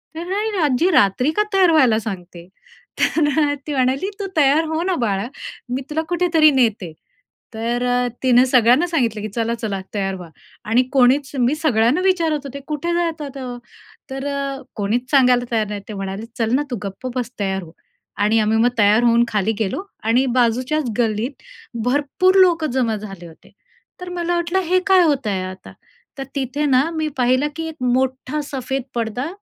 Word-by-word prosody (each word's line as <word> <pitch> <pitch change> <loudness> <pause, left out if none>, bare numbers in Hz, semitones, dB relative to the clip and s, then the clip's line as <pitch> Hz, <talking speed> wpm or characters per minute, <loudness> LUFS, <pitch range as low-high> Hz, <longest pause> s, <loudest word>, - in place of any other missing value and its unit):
तर 330 - -5
अरे, 420 0 -1
आज्जी 295 +6 +2
रात्री 250 - +3
का 420 - +4
तयार 370 -3 +5
व्हायला 255 -8 +4
सांगतेय? 180 -5 -8 0.5
तर 310 -2 +2 0.2
अ, - - 0
ती 295 - -2
म्हणाली, 265 +8 0
"तू 395 - -3
तयार 290 +2 +4
हो 325 +2 -1
ना 370 -1 0
बाळा, 200 +2 -1 0.5
मी 265 - -2
तुला 315 +2 -1
कुठेतरी 335 -3 +4
नेते." 220 - +1 0.6
तर 235 +2 -2
अ, 245 0 +1 0.2
तिनं 250 -1 +5
सगळ्यांना 255 +6 +4
सांगितलं, 235 -10 -1
की 215 - -3
"चला, 230 0 0
चला, 210 -4 -4 0.2
तयार 195 -1 -1
व्हा." 175 -3 -10 0.4
आणि 245 +2 +5
कोणीच 270 +2 +3
मी 250 +5 +2
सगळ्यांना 265 0 +2
विचारत 335 -5 +1
होते, 280 +1 -7
"कुठे 315 +3 -2
जातात?" 320 -5 -2
अ, 260 -1 -6 0.6
तर 270 +1 -5
अ, 275 -1 -3
कोणीच 235 +5 -2
सांगायला 250 -3 +4
तयार 220 -2 +1
नाही. 205 -1 -5
ते - - -5
म्हणाले, 195 +2 -5
"चल 225 -1 0
ना, 290 - +2
तू - - -1
गप्प 195 +6 -6
बस, 245 -2 -2
तयार 190 -2 -1
हो." 160 - -13 0.5
आणि 220 +2 +3
आम्ही 215 +1 +2
मग 240 +2 +4
तयार 210 +3 +4
होऊन 235 0 +4
खाली 210 0 0
गेलो 215 - -1 0.2
आणि 240 +4 +2
बाजूच्याच 250 +4 +1
गल्लीत 230 +4 -1 0.4
भरपूर 290 +8 +2
लोकं 330 -6 +3
जमा 240 -4 0
झाले 195 -5 -9
होते. 160 - -18 0.5
तर 360 - -6
मला 345 0 -1
वाटलं, 345 +2 0
हे 370 +1 +1
काय 375 -2 +6
होत 280 -7 +1
आहे 190 -2 -1
आता? 185 0 -9 0.4
तर 270 - -4
तिथे 280 +2 -2
ना, 275 +3 +3
मी 315 -1 -1
पाहिलं 255 +3 +2
की 325 0 -4
एक 315 - -9 0.2
मोठा 265 +3 -1
सफेद 265 0 -3
पडदा 235 +4 -2
255 Hz, 180 wpm, -20 LUFS, 220-305 Hz, 0.6 s, काय